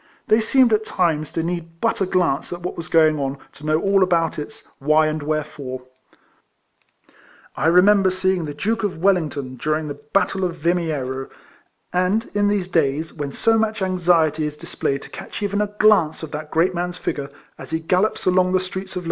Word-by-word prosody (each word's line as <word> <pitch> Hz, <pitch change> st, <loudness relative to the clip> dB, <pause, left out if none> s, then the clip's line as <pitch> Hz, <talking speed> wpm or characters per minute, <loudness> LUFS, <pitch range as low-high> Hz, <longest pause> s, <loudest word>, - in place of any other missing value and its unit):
They 220 Hz, +1 st, +5 dB
seemed 245 Hz, +1 st, +4 dB
at 215 Hz, 0 st, +2 dB
times, 160 Hz, -7 st, 0 dB
to 165 Hz, -, -1 dB
need 165 Hz, -1 st, -5 dB
but -, -, 0 dB
a 190 Hz, -, +2 dB
glance 180 Hz, -7 st, 0 dB
at 175 Hz, 0 st, -5 dB
what 180 Hz, -, -4 dB
was 170 Hz, -, -6 dB
going 155 Hz, -2 st, +4 dB
on 135 Hz, 0 st, -2 dB, 0.2 s
to 140 Hz, -, -17 dB
know 155 Hz, +1 st, +2 dB
all 195 Hz, +2 st, +2 dB
about 170 Hz, -4 st, +1 dB
its 150 Hz, -, -8 dB
" -, -, -42 dB
why 155 Hz, 0 st, +5 dB
and 155 Hz, 0 st, -1 dB
wherefore." 145 Hz, -4 st, -4 dB, 1.7 s
I 155 Hz, -, 0 dB
remember 190 Hz, +3 st, +5 dB
seeing 185 Hz, -2 st, 0 dB
the 145 Hz, -1 st, -6 dB
Duke 220 Hz, +9 st, -1 dB
of 205 Hz, -5 st, -2 dB
Wellington 155 Hz, -8 st, 0 dB
during 155 Hz, +3 st, -1 dB
the -, -, -3 dB, 0.2 s
battle 195 Hz, -1 st, +1 dB
of 175 Hz, -2 st, -1 dB
Vimiero; 155 Hz, -6 st, -1 dB, 0.6 s
and 185 Hz, +5 st, +1 dB
in 205 Hz, 0 st, +2 dB
these 205 Hz, -3 st, 0 dB
days, 160 Hz, -2 st, 0 dB
when 145 Hz, -2 st, -5 dB
so 225 Hz, +9 st, +2 dB
much 220 Hz, -2 st, -1 dB
anxiety 165 Hz, -4 st, +2 dB
is 150 Hz, 0 st, -7 dB
displayed 145 Hz, -4 st, -3 dB
to -, -, -11 dB
catch -, -, -7 dB
even 205 Hz, 0 st, 0 dB
a 210 Hz, -, +1 dB
glance 185 Hz, -8 st, +3 dB
of 155 Hz, -, -6 dB
that 150 Hz, 0 st, -6 dB
great 170 Hz, +4 st, +2 dB
man's 180 Hz, 0 st, -3 dB
figure 140 Hz, -4 st, -3 dB, 0.3 s
as -, -, -9 dB
he 160 Hz, -, -1 dB
gallops 180 Hz, +6 st, 0 dB
along 185 Hz, 0 st, +3 dB
the 185 Hz, -, +4 dB
streets 190 Hz, +1 st, -6 dB
of. -, -, -1 dB
170 Hz, 195 wpm, -21 LUFS, 155-190 Hz, 1.7 s, They